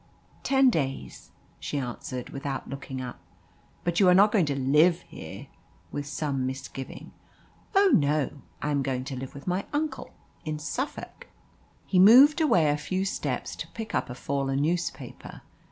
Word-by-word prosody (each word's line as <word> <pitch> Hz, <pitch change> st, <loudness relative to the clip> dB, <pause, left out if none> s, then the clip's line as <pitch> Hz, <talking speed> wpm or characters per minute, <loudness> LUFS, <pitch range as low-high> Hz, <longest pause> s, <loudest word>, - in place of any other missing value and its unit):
"Ten 265 Hz, -1 st, +4 dB
days," 135 Hz, -, -3 dB, 0.3 s
she 145 Hz, -, -4 dB
answered, 125 Hz, -1 st, -5 dB
without 135 Hz, -1 st, -4 dB
looking 135 Hz, -1 st, -6 dB
up. 125 Hz, -1 st, -7 dB, 0.6 s
"But 175 Hz, -1 st, 0 dB
you 190 Hz, -3 st, +6 dB
are 180 Hz, -, +6 dB
not 205 Hz, +3 st, +6 dB
going 190 Hz, -8 st, +3 dB
to 140 Hz, -1 st, -1 dB
live 150 Hz, +6 st, +4 dB
here?" -, -, -9 dB, 0.5 s
with 145 Hz, -1 st, -4 dB
some 140 Hz, -3 st, -2 dB
misgiving. 135 Hz, 0 st, -7 dB, 0.6 s
"Oh 395 Hz, -1 st, +6 dB
no. 145 Hz, -1 st, +1 dB, 0.2 s
I 150 Hz, -, 0 dB
am 140 Hz, -1 st, +1 dB
going 130 Hz, -1 st, -2 dB
to 135 Hz, 0 st, -5 dB
live 130 Hz, +1 st, -7 dB
with 140 Hz, -, -10 dB
my 180 Hz, +2 st, 0 dB
uncle 305 Hz, +1 st, -2 dB, 0.3 s
in 155 Hz, -1 st, -3 dB
Suffolk." 265 Hz, -, -5 dB, 0.6 s
He 185 Hz, -, +2 dB
moved 265 Hz, -, +8 dB
away 175 Hz, -, +4 dB
a 145 Hz, -, +1 dB
few 185 Hz, +6 st, -2 dB
steps 195 Hz, -, -3 dB
to -, -, -5 dB
pick 225 Hz, -1 st, -7 dB
up -, -, -1 dB
a 125 Hz, -, -6 dB
fallen 135 Hz, +1 st, -1 dB
newspaper. 170 Hz, +2 st, -3 dB
150 Hz, 160 wpm, -27 LUFS, 135-190 Hz, 0.6 s, moved